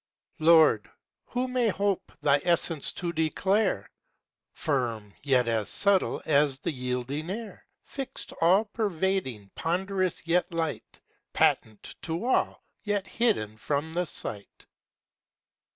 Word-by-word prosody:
Lord, 155 -9 +5 0.4
who 250 +1 -1
may 250 -2 +1
hope 200 -1 -1
thy 145 0 +4
essence 170 -3 +1
to 175 -1 -3
declare? 190 +6 +1 0.6
Firm, 115 -9 -2
yet 130 -4 +2
as 110 -3 0
subtile 200 -2 +2
as 145 -3 +3
the 140 - -3
yielding 125 +4 -3
air: 220 +3 -7 0.2
Fixt, 270 -2 -6
all 185 +6 +5
pervading; 190 - -2
ponderous, 185 +1 -1
yet 175 +2 +1
light, 165 -2 -3 0.3
Patent 110 -2 +1
to 165 +6 -3
all, 255 - +1 0.2
yet 205 -2 -1
hidden 195 - 0
from 145 +8 -2
the 180 +1 0
sight. 100 -7 -5
165 Hz, 115 wpm, -28 LUFS, 135-195 Hz, 0.6 s, Lord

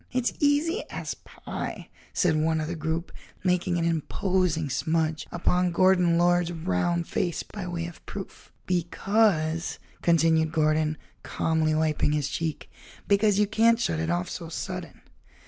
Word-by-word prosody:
"It's 255 -1 0
easy 300 +9 +2
as - - -4
pie," - - -7 0.2
said 175 -4 +2
one 160 +1 +1
of 155 - -2
the 175 - -3
group, 160 +2 -3 0.3
making 180 -1 +1
an 165 - 0
imposing 170 0 0
smudge 160 +3 -1
upon 180 +1 +1
Gordon 180 -1 +4
Lord's 175 0 +3
round 165 - -1
face 175 -2 -1
by 200 -4 -7
way 170 -1 -3
of 170 -1 -10
proof. 195 -2 -8
"Because," 175 -2 +1 0.2
continued 160 -1 +3
Gordon, 155 -1 +1 0.2
calmly 160 -1 0
wiping 155 -1 +1
his 145 -2 0
cheek, 160 +2 -3 0.4
"because 200 0 +3
you 210 - +4
can't 225 +2 +3
shut 165 -8 0
it 165 0 -1
off 175 +1 0
so 165 -2 -6
sudden." 180 +1 -6
170 Hz, 145 wpm, -26 LUFS, 160-185 Hz, 0.4 s, Gordon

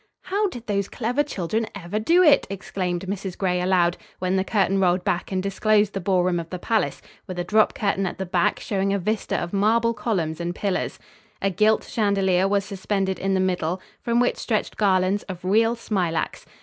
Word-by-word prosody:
"How 400 +3 0
did 245 -11 -8
those 200 -2 -1
clever 245 +4 0
children 220 - -2
ever 200 +2 -3
do 340 +11 +4
it?" 295 -4 +5
exclaimed 185 -2 -3
Mrs. 190 -1 -4
Gray, 180 -2 0
aloud, 180 -1 +2 0.2
when 185 +1 -1
the 190 - +2
curtain 195 -1 +1
rolled 180 -1 +2
back 190 -2 -1
and 185 -1 -1
disclosed 205 +1 +2
the 195 - -2
ballroom 180 -1 +1
of 165 -1 -7
the 180 - -4
palace, 220 +4 -1 0.2
with 185 -2 -6
a 175 - -1
drop 215 +4 +3
curtain 195 -2 0
at - - -5
the 190 - -3
back 175 -1 +1
showing 195 -1 -1
a - - +1
vista 210 +3 -1
of 170 +2 -4
marble 230 +4 +3
columns 175 -9 -2
and 175 +1 -3
pillars. 200 -3 -2 0.4
A 195 - 0
gilt 215 +4 +3
chandelier 195 -4 +1
was 200 0 +1
suspended 195 -1 -2
in 195 0 0
the - - +2
middle, 180 -1 0 0.2
from 235 0 +1
which 245 - +2
stretched 220 -3 -1
garlands 190 0 +2
of 185 -1 -7
real 225 +4 +3
smilax. 185 -8 -2
195 Hz, 195 wpm, -24 LUFS, 185-215 Hz, 0.4 s, it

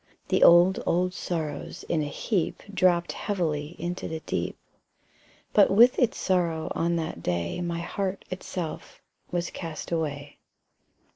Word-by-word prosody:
The - - +2
old, 175 +2 +7
old 180 +1 +2
sorrows 160 -6 -4
in 160 - +1
a 150 - -2
heap 180 +4 -2
Dropped 175 -3 +3
heavily 165 -5 -2
into 175 +1 -4
the 160 0 -4
deep; - - -3 1.0
But 205 - +6
with 235 +5 +6
its 245 -3 +2
sorrow 170 -4 0
on 170 +1 0
that 160 - -3
day 85 - -2
My 170 -1 -2
heart 195 +2 -3
itself 185 -2 -5 0.3
was 175 0 -2
cast 165 -2 -6
away. 145 -3 -3
170 Hz, 135 wpm, -27 LUFS, 160-185 Hz, 1.0 s, old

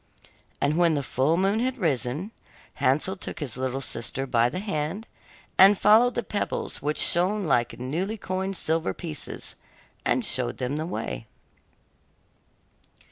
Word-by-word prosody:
And 150 +4 +1
when 170 -2 +4
the 140 - -1
full 135 +6 +1
moon 195 +4 +2
had 255 +2 -1
risen, 150 - -1 0.5
Hansel 155 +9 +2
took 190 - -7
his 135 -8 -4
little 130 +1 -2
sister 135 +1 -2
by 120 -2 +3
the 125 - -5
hand, 185 +1 -3 0.5
and 195 +2 +8
followed 225 +6 +5
the 240 - -1
pebbles 205 0 -3
which 150 +2 -1
shone 190 +4 +2
like 120 -6 +1
newly 170 - -2
coined 190 0 -3
silver 165 +1 0
pieces, 155 -5 -6 0.5
and - - +1
showed - - -1
them 130 +4 -2
the 155 +1 -3
way. 115 -9 -4
165 Hz, 140 wpm, -26 LUFS, 135-195 Hz, 0.5 s, and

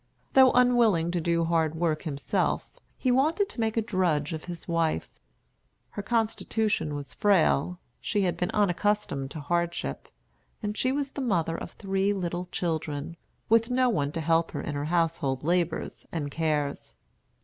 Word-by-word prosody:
Though 260 -1 +7
unwilling 235 -9 +4
to 175 -1 -1
do 170 0 +1
hard 165 -2 +1
work 160 -2 0
himself, 145 -4 -2 0.2
he 255 - +1
wanted 315 +10 +2
to - - -10
make 225 0 0
a 225 - +2
drudge 175 -7 0
of 160 - -6
his 175 -1 -7
wife. 165 - 0 0.8
Her 205 - -4
constitution 220 -6 0
was 145 -1 -6
frail, 180 -4 +2 0.2
she 205 -3 0
had 180 -2 +1
been 180 - -1
unaccustomed 205 -8 0
to 155 - -7
hardship, 170 +3 -2 0.6
and 210 0 -2
she 255 - +1
was 280 0 -2
the 280 - -5
mother 170 -9 0
of - - -7
three 195 0 0
little 180 -2 -3
children, 160 -2 -2 0.3
with 230 +1 +4
no 255 0 +3
one 145 -9 0
to 165 - -2
help 165 +1 +2
her - - -3
in 150 - -4
her 145 0 -2
household 160 -5 0
labors 170 0 -1
and 145 -4 -3
cares. 150 -2 -2
175 Hz, 160 wpm, -27 LUFS, 160-210 Hz, 0.8 s, Though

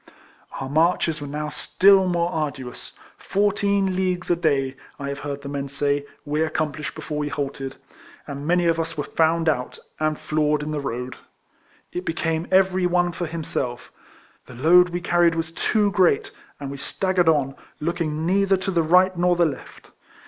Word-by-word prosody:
Our 135 - -4
marches 165 +1 +1
were 145 - -5
now 150 +1 -4
still 190 +5 +4
more 175 -1 0
arduous; 140 -6 -5 0.3
fourteen 200 -1 +1
leagues 180 -1 -1
a - - +4
day, 140 -5 0 0.2
I 140 0 -5
have 140 0 -4
heard 140 -1 -5
the - - -6
men 140 0 -4
say, 145 +1 -1 0.2
we 150 +1 -1
accomplished 155 -1 -2
before 150 -1 -5
we 150 - -1
halted; 135 -2 -4 0.5
and 140 +1 -6
many 175 0 +3
of 165 -1 +2
us 165 -1 -3
were 145 - -1
found 165 +2 +1
out, 125 -5 0 0.2
and 155 -1 0
floored 150 -1 0
in 150 - -4
the 150 - -2
road. 125 -2 -4 0.7
It 180 - -4
became 165 0 -2
every 190 -1 +3
one 175 0 +2
for 175 0 -4
him 165 0 -5
self. 120 -4 -4 0.6
The 125 - -11
load 175 +7 +5
we 175 0 -3
carried 175 -1 +3
was 165 0 -2
too 205 +4 +1
great, 180 -6 +2 0.3
and 140 -1 -5
we 140 - -6
staggered 185 +4 +1
on, 140 -4 +2 0.3
looking 160 -1 -2
neither 195 +2 +3
to 190 +1 -3
the 170 -2 +2
right 180 +3 +4
nor 175 0 +2
the 175 0 +3
left. 150 -4 -7
160 Hz, 180 wpm, -23 LUFS, 145-180 Hz, 0.7 s, load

